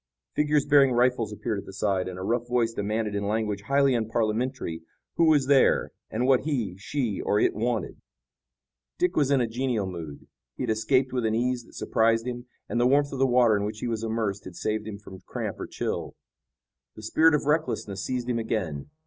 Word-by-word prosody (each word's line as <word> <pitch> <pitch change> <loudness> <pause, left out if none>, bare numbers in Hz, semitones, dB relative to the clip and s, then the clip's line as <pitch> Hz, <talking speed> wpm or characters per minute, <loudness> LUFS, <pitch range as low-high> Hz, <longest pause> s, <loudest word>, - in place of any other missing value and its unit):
Figures 150 -1 +2
bearing 140 -3 +5
rifles 120 -3 +2
appeared 105 0 -3
at - - -11
the 95 - -9
side, 95 -2 0
and 90 -1 -6
a 95 - -5
rough 120 +4 -1
voice 120 -2 +1
demanded 105 0 -2
in 100 0 -2
language 105 -2 -1
highly 140 -1 +3
unparliamentary 115 -4 -1 0.4
who 170 - +5
was 150 -4 +4
there 135 -1 +4 0.2
and 120 +3 -1
what 130 -1 +5
he, 120 - -2
she 115 -1 -2
or 105 - +1
it - - +3
wanted. 115 +1 -2 1.0
Dick 180 0 +1
was 145 -3 +2
in 140 -2 +3
a 120 - +1
genial 120 -2 -1
mood. 85 -6 -7 0.3
He - - -3
had - - 0
escaped 115 +4 +1
with 125 -2 0
an 110 0 +1
ease 125 0 -1
that - - -18
surprised 115 +1 +1
him, 120 0 -5 0.2
and 120 - 0
the 120 - +4
warmth 140 +2 +2
of 135 - -4
the 135 - +4
water 120 -3 +4
in 100 - 0
which 105 +1 -3
he - - -2
was 115 -2 -2
immersed 110 -3 -2
had 90 - -9
saved 110 +3 -2
him 105 -2 -6
from 95 -2 -12
cramp - - -4
or - - -5
chill. - - -4 0.8
The 110 - -11
spirit 160 +8 +4
of 150 - -1
recklessness 145 -10 -1
seized 125 -1 -3
him 120 -2 0
again. 90 - -3
115 Hz, 210 wpm, -26 LUFS, 105-130 Hz, 1.0 s, bearing